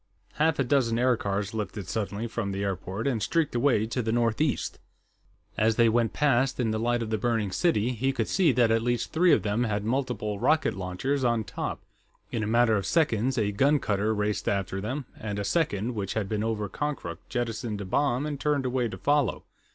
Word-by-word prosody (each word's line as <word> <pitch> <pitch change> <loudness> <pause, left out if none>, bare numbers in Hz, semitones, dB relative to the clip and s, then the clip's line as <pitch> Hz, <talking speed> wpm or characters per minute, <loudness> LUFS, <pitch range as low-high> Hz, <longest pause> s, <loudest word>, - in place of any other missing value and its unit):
Half 160 +1 +2
a 140 - +2
dozen 125 -3 +2
aircars 105 -5 0
lifted 105 -3 -4
suddenly 105 0 -3
from 110 -3 -3
the 100 +1 -3
airport 95 +2 -3
and 125 -6 0
streaked 160 +8 0
away 120 -3 +2
to 120 +3 -2
the 110 -1 -1
northeast. 120 +5 0 0.8
As 110 +1 +3
they 115 0 +5
went 115 -1 +2
past, 135 -2 +1
in 115 -3 +1
the 110 - -1
light 120 +1 +1
of 110 - -5
the 110 - 0
burning 110 -3 0
city, 125 - +1
he 130 +3 0
could 120 -5 -2
see 180 -5 +3
that 120 -2 +3
at 115 0 +3
least 120 0 -1
three 175 +2 +4
of - - +4
them 105 +3 0
had 105 -2 -1
multiple 115 -4 -1
rocket 155 +6 +2
launchers 95 +10 -2
on 120 -2 +2
top. 95 -1 -5 0.5
In 115 - -1
a 105 - -2
matter 115 0 +4
of 100 - -3
seconds, 130 -6 +1
a 105 -3 +1
gun 140 +9 +3
cutter 105 -4 0
raced 105 0 -1
after 95 -1 -2
them, 130 +6 -3
and 105 -2 -4
a 100 - -2
second, 120 - 0
which 100 -3 -3
had 110 -3 -1
been 105 +1 -1
over 110 -2 -1
Konkrook, 140 - -4
jettisoned 115 -3 -3
a - - -5
bomb 135 +6 +1
and 145 -2 -4
turned 145 -2 0
away 125 -1 0
to - - -7
follow. 145 -4 +1
115 Hz, 205 wpm, -27 LUFS, 105-130 Hz, 0.8 s, they